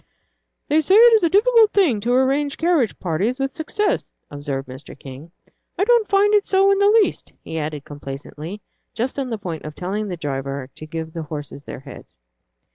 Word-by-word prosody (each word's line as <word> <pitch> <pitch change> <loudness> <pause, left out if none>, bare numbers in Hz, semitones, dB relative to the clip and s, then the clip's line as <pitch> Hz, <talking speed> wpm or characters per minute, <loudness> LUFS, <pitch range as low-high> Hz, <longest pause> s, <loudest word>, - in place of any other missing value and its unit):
"They 305 +2 +3
say 375 +5 +3
it 470 +2 +8
is 440 - +4
a 335 - +4
difficult 440 +3 +4
thing 330 - +3
to 235 +4 -2
arrange 275 +3 +1
carriage 325 - +1
parties 190 +9 -1
with 270 0 -2
success," 400 +7 -2 0.2
observed 145 -1 -5
Mr. 130 +2 -10
King. 135 +5 -11 0.5
"I 390 - +2
don't 465 0 +3
find 405 +1 +3
it 415 -1 +3
so 390 +1 +4
in 395 - +2
the 405 0 +5
least," - - -5
he 160 - -5
added, 150 -2 -4
complacently, 145 +6 -8 0.3
just 255 +4 -2
on 265 -2 -3
the 225 - -3
point 170 -6 -6
of 150 0 -8
telling 205 +4 -3
the 180 -3 -5
driver 135 -3 -4
to 155 - -10
give 160 0 -6
the 165 - -4
horses 145 -2 -7
their - - -8
heads. - - -13
210 Hz, 195 wpm, -21 LUFS, -, 0.5 s, it